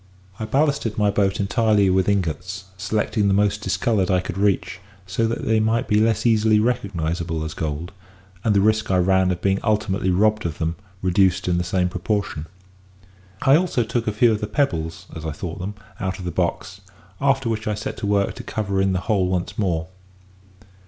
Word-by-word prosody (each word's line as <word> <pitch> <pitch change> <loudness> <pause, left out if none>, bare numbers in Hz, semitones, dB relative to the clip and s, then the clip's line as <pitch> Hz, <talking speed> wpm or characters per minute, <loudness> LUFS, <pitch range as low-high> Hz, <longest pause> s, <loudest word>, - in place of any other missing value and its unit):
"I 110 - -2
ballasted 140 -2 0
my 105 -1 +3
boat 100 -1 +1
entirely 105 0 +2
with 95 +1 +2
ingots; 95 0 -2
selecting 105 +2 0
the 100 - +3
most 105 +1 +1
discoloured 95 0 0
I 90 -1 +3
could 90 -1 -5
reach, 100 -2 0 0.3
so 95 +5 0
that 115 - -3
they 110 0 +3
might 110 +2 +1
be 105 0 +3
less 110 -1 +1
easily 110 -2 +4
recognisable 85 -8 -1
as 80 - -5
gold, 80 +4 -4 0.5
and 105 -2 +2
the 100 - +4
risk 110 +1 +2
I 95 - +3
ran 95 +1 +3
of 90 -1 -3
being 95 0 +2
ultimately 105 -3 0
robbed 105 +4 +2
of 80 - -6
them 80 0 -1 0.3
reduced 95 0 +2
in 90 -1 +2
the - - 0
same 90 +1 0
proportion. 90 -3 -2 1.0
I 135 0 +6
also 165 -7 +2
took 115 +1 -2
a - - +2
few 115 +3 +4
of 105 - -1
the 105 - -2
pebbles 85 - -1
(as 80 - -7
I 80 - -3
thought 85 +2 -6
them) 100 +3 -5 0.2
out 95 -2 -2
of 90 - -8
the 90 - -2
box; 90 +2 -2 0.4
after 135 -2 +2
which 110 -1 -2
I 105 - 0
set 105 - -5
to 100 - -3
work 100 -1 +1
to - - -9
cover 100 -3 -1
in 95 -1 +2
the 90 - -1
whole 100 -4 +1
once 90 -1 -2
more. 85 -6 0
100 Hz, 200 wpm, -22 LUFS, 90-110 Hz, 1.0 s, I